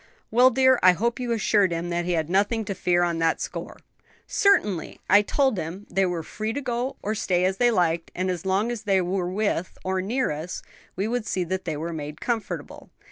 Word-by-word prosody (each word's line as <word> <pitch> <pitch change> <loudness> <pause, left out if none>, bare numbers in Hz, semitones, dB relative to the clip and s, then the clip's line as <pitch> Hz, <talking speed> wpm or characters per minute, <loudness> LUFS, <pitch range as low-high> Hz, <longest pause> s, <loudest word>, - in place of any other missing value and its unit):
'" - - -37
"Well, 250 +3 +6
dear, 260 -1 +4
I 185 0 +7
hope 235 +7 -1
you 245 -1 -2
assured 210 -4 +2
him 170 +1 -3
that 170 0 -1
he 180 - 0
had 160 -2 0
nothing 205 +5 +1
to 200 - -3
fear 175 -2 +1
on 170 -1 0
that 165 0 +1
score." - - -6 0.5
"Certainly; 210 - +1
I 205 +1 +6
told 265 0 +1
him 175 +6 -6
they 195 -1 +2
were 175 -2 -3
free 215 +6 -4
to 285 - -2
go 250 +1 -2
or 210 - -1
stay 185 -5 +1
as 190 +1 0
they 245 -1 +4
liked, 170 -6 +1
and 185 +1 0
as 175 -3 -4
long 195 +5 +1
as 235 -3 -4
they 195 -2 +2
were 180 0 -1
with, 195 -2 -2
or 190 0 -1
near 245 +5 0
us, 155 +4 -5 0.3
we 195 +3 -1
would 235 -1 -2
see 185 - 0
that 185 +2 -3
they 160 -3 -2
were 165 +3 -4
made 150 -1 -6
comfortable. 230 -3 -4
190 Hz, 225 wpm, -25 LUFS, 175-225 Hz, 0.5 s, I